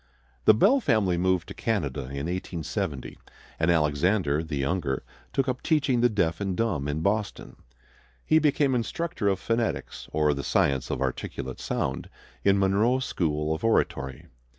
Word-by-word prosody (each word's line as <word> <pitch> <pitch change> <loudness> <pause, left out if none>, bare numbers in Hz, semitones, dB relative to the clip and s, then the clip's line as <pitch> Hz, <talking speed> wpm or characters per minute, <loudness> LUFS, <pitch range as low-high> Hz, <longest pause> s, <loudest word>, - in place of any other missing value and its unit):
The 110 - +7
Bell 230 - +5
family 110 - +2
moved 90 0 +1
to - - -6
Canada 80 - -1
in 70 +2 -5
1870, 85 -2 -4 0.4
and 80 +1 +2
Alexander, 80 0 +2
the 80 -3 -4
younger, 70 -1 -1 0.3
took 135 -1 0
up 125 -1 -2
teaching 135 -6 +2
the 120 - +5
deaf 85 -6 0
and 95 -2 -2
dumb 100 -12 0
in 75 +2 -2
Boston. 100 +3 -2 0.7
He 155 - +5
became 145 -2 +2
instructor 125 0 -2
of 95 -1 +2
phonetics, 115 +1 -2
or 75 -1 +2
the 70 0 -4
science 65 +1 +1
of - - -1
articulate 65 0 -4
sound, 65 - -2 0.3
in 100 0 +4
Monroe's 105 +7 +2
School 75 -2 -1
of 80 - -5
Oratory. 70 - 0
95 Hz, 150 wpm, -26 LUFS, 75-115 Hz, 0.7 s, The